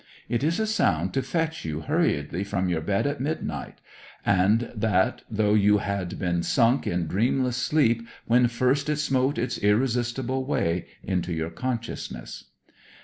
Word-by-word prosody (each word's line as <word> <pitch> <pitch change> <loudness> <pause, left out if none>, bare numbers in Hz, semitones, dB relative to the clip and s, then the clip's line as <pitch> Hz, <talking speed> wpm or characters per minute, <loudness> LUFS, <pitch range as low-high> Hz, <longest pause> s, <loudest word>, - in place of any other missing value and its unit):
It 120 +2 -1
is 165 +5 +1
a 220 - +1
sound 95 - +1
to 135 - +1
fetch 165 +2 -2
you 80 -1 -3
hurriedly 75 +3 0
from 100 -2 -1
your 85 -3 0
bed 100 - 0
at 145 -1 -1
midnight; 155 +4 -4 0.4
and 105 +6 +3
that 105 -4 +1
though 105 -1 +1
you 105 0 +5
had 100 -3 -3
been 85 -2 0
sunk 120 +7 +2
in 85 -1 0
dreamless 120 - +1
sleep 115 -4 +2 0.2
when 120 +1 +4
first 130 +5 +1
it 150 - +1
smote 135 -1 +1
its 125 - -2
irresistible 120 +4 +1
way 90 - -1 0.2
into 90 -2 -1
your 80 0 -2
consciousness. 115 +4 -5
115 Hz, 150 wpm, -26 LUFS, 95-130 Hz, 0.4 s, you